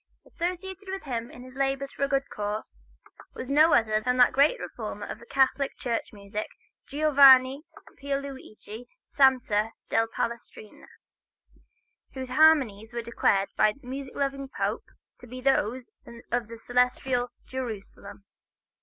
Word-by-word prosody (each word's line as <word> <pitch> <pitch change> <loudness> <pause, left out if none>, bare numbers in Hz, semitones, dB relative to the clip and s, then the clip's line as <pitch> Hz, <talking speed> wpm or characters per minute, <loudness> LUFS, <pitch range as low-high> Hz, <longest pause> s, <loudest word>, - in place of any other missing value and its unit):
Associated 370 +3 -5
with 385 0 -5
him 235 -4 -4
in 245 - -12
his 255 0 -13
labors 275 0 -1
for - - -12
a - - -3
good 275 0 0
cause, 210 +1 -5 0.5
was 260 - -6
no 305 +3 +6
less 235 - +5
a - - -7
composer 215 0 +1
than 250 0 0
that 245 - +5
great 290 - +3
reformer - - -6
of - - -8
Catholic 270 +1 +1
church 235 -2 -3
music, 205 +1 -6 0.4
Giovanni 275 -1 +6 0.4
Pierluigi 270 -5 -6 0.2
Sante 245 -6 +3 0.2
da 225 0 +2
Palestrina, 235 -2 -6 1.3
whose 260 -1 -5
harmonies 255 -7 +3
were 235 - -3
declared 200 -4 +1
by 215 - +4
a 260 +5 -9
music 265 +1 -7
loving 275 -1 -2
Pope - - -2 0.3
to 245 - -13
be 255 +2 -8
those 255 -2 0 0.4
of 240 -2 0
the 230 0 -9
celestial 250 +1 0 0.2
Jerusalem. 205 -5 -7
255 Hz, 140 wpm, -27 LUFS, 230-275 Hz, 1.3 s, no